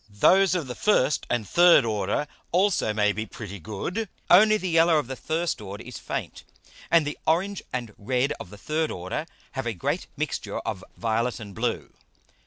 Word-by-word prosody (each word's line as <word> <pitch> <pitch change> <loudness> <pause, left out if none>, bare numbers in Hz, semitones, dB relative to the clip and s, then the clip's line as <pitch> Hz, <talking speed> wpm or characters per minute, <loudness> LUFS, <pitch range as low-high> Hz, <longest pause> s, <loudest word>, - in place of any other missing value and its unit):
Those 185 - +4
of 170 -5 -1
the 125 - -5
first 150 -6 +2
and 115 -4 -1
third 175 -7 +6
order 105 +4 0 0.3
also 185 - +2
may 105 -1 +2
be 110 +2 -4
pretty 100 -2 -8
good; 170 - -4 0.2
only 215 +4 +7
the 190 - -4
yellow 165 -1 +4
of 150 - 0
the 130 +2 -5
first 160 -1 -2
order 100 0 -7
is - - -8
faint, - - -5 0.5
and 165 -2 +4
the 145 - -4
orange 185 +5 +1
and 120 -4 -4
red 125 +6 0
of - - -8
the 105 - -11
third 155 +7 -1
Order 90 +1 -4 0.2
have - - -4
a - - -1
great - - -2
Mixture - - -3
of 95 - -4
violet 115 -1 0
and 100 -2 -9
blue. - - -2
130 Hz, 185 wpm, -26 LUFS, 105-170 Hz, 0.5 s, only